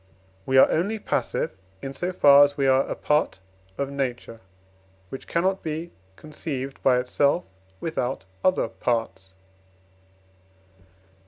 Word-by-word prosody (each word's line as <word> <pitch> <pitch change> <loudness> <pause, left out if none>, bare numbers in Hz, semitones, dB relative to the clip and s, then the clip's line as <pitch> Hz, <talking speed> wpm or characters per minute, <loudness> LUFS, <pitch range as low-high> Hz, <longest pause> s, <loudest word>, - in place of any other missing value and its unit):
We 130 - +3
are - - +8
only 200 +7 0
passive, - - -2 0.3
in 135 0 -5
so 180 +6 -2
far 145 -5 +7
as 145 0 +1
we 140 - +1
are 135 0 +3
apart 150 -9 0 0.4
of 140 0 -2
Nature, 125 -4 -4 0.7
which 135 - -8
cannot 190 +3 0
be 160 +2 -5 0.2
conceived 140 - -6
by 130 -2 +4
itself 125 -3 +1 0.4
without 130 - -3 0.2
other 185 -9 +2
parts. 115 -5 -3
140 Hz, 115 wpm, -25 LUFS, 130-160 Hz, 0.7 s, are